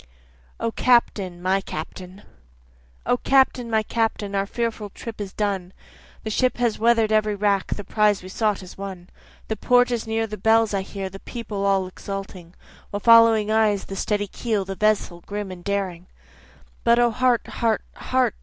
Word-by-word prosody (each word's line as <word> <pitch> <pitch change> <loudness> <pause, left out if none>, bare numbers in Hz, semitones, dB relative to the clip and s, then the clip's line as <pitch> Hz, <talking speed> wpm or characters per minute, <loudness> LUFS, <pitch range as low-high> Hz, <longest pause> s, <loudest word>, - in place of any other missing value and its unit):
O 230 0 -1
Captain! 205 -8 +2
My 190 +1 +2
Captain! 185 +5 -8 0.8
O 245 - +2
Captain! 260 -2 +2
my 220 -1 +2
Captain! 220 -2 -1
our 195 0 0
fearful 230 -2 -3
trip 225 +2 -8
is 195 -2 -5
done, 195 -3 -2 0.5
The 220 - -4
ship 255 +4 +1
has 240 -3 0
weather'd 225 -1 +3
every 215 -1 +2
rack, 200 -1 0
the 205 - -6
prize 210 -1 +2
we 185 - -9
sought 210 -1 0
is 185 +1 -12
won, 190 -2 -7 0.4
The 220 - -2
port 245 0 +3
is 235 -1 -2
near, 225 0 0
the 215 -1 -6
bells 220 +1 +3
I 195 - 0
hear, 195 0 -5
the 195 +1 -10
people 215 -4 -5
all 195 -1 +2
exulting, 185 -2 -8 0.3
While 205 - -3
follow 230 0 +7 0.2
eyes 215 -2 +2
the 195 - -7
steady 205 +1 -1
keel, 210 0 -2
the 195 - -4
vessel 205 -4 0
grim 205 -1 -4
and 180 -1 -10
daring; 185 -3 -3 0.8
But 235 0 +4
O 240 -1 +4
heart! 250 +1 +2
heart! 225 -3 -1
heart! 255 -4 0
210 Hz, 175 wpm, -23 LUFS, 195-230 Hz, 0.8 s, follow